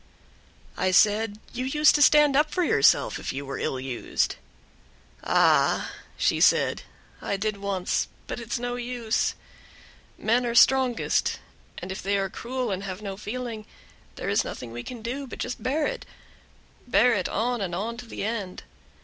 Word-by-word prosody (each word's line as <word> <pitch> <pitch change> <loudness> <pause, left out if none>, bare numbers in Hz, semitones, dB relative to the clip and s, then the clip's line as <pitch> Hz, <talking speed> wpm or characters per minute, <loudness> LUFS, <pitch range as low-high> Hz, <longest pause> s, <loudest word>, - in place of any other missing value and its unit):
I 185 - +1
said, 210 +2 +3 0.2
"You 250 - -3
used 300 +3 +4
to 295 - +2
stand 295 -1 +6
up 300 +2 +3
for 360 - 0
yourself 140 - +3
if - - -4
you 140 +1 -5
were 135 - -5
ill 130 - -2
used." 130 -2 -2 0.9
"Ah!" - - +3 0.3
she - - +1
said, - - +4 0.4
"I 200 - -2
did 215 +1 -2
once, 195 -2 -1 0.2
but - - -5
it's 235 +1 -3
no 245 0 -3
use; 240 -2 -1 0.8
men 235 +3 +1
are 235 - -2
strongest, 260 -1 +3 0.4
and 180 +2 -6
if 190 - -5
they 200 +1 0
are 195 -1 -2
cruel 250 -1 -3
and 190 0 -2
have 195 +1 -6
no 195 -2 -4
feeling, 220 +1 -6 0.5
there - - -6
is - - +2
nothing 125 - -7
that - - -11
we 120 - -5
can 240 -3 -8
do, 265 +4 -4
but - - -8
just 250 - -4
bear 290 +5 0
it - - -4 0.8
bear 245 +1 +4
it 185 -5 -1
on 240 +2 -1
and 175 -3 -2
on 220 +6 -3
to 245 -1 -9
the - - -6
end. 205 -4 -4
225 Hz, 175 wpm, -26 LUFS, 195-250 Hz, 0.9 s, stand